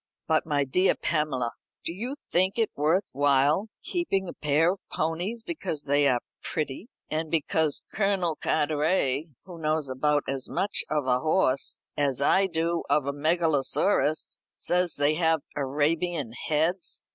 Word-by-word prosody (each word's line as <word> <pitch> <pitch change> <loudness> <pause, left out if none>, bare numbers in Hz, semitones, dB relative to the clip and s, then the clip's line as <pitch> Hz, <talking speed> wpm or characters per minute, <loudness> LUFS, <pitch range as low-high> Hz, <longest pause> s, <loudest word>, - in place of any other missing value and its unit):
"But, 160 -1 +2
my 145 -2 +2
dear 180 +8 +2
Pamela, 145 -7 -1 0.3
do 165 - -2
you 240 +9 -4 0.2
think 185 +4 +2
it 225 -2 +1
worth 160 +7 +2
while 145 - +3 0.2
keeping 195 - -1
a - - -5
pair 150 +3 +2
of 195 - -11
ponies 175 +9 -2
because 190 - -3
they 145 0 +3
are 125 -3 +2 0.2
pretty, 155 - -4 0.2
and 155 +1 -1
because 155 -1 0
Colonel 195 -5 +1
Carteret, 150 -1 +1 0.2
who 175 -3 -10
knows 155 -2 0
about 145 +3 +1
as 135 -1 -3
much 200 +2 0
of 150 -3 0
a 125 -1 +2
horse 155 -3 +1
as 140 -3 0
I 190 +7 +4
do 170 -1 -1
of 145 0 +3
a 140 - -1
megalosaurus 155 0 +1 0.2
says 180 -1 +1
they 145 +1 +2
have 160 -1 +2
Arabian 145 +1 0
heads? 160 +7 -1
155 Hz, 145 wpm, -27 LUFS, 145-175 Hz, 0.3 s, I